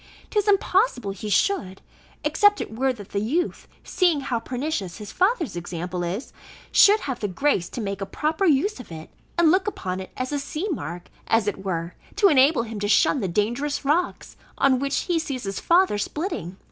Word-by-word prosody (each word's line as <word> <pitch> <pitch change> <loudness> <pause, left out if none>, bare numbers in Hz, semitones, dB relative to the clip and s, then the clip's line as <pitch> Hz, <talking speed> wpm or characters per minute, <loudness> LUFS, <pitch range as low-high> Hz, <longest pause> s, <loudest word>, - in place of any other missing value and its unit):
'Tis 420 -1 +1
impossible 385 - +2
he 200 +2 -6
should, 195 - +1 0.4
except 410 +8 +4
it 220 - -5
were 265 +3 +1
that 210 -6 -9
the 200 - -1
youth, 295 - -1 0.2
seeing 345 -6 +2
how 245 -3 -1
pernicious 245 - -3
his 210 -1 -8
father's 370 - +1
example 175 +1 -4
is, 185 +9 -4 0.4
should 415 +2 +6
have 260 -3 -4
the 205 - -1
grace 195 -2 0
to - - -6
make 200 -2 -4
a - - -1
proper 315 - -1
use 345 +2 +2
of 250 - -11
it, 160 -1 -9 0.3
and 335 -2 +5
look 370 +2 +2
upon 185 - -3
it 190 - -7
as 255 +1 -3
a 290 - -1
sea 305 +7 -4
mark, 175 - -5 0.2
as 225 -2 +2
it 195 -1 -3
were, 170 -2 -3 0.2
to 405 -1 +5
enable 275 -2 +4
him 225 -2 -6
to 205 - -1
shun 245 +6 +4
the 200 - -1
dangerous 240 - -1
rocks, 330 +6 0 0.2
on 265 -2 +3
which 275 +1 0
he 350 -3 0
sees 275 -5 -4
his 195 -1 -3
father 345 - +3
splitting. 205 - -4
255 Hz, 195 wpm, -24 LUFS, 200-330 Hz, 0.4 s, should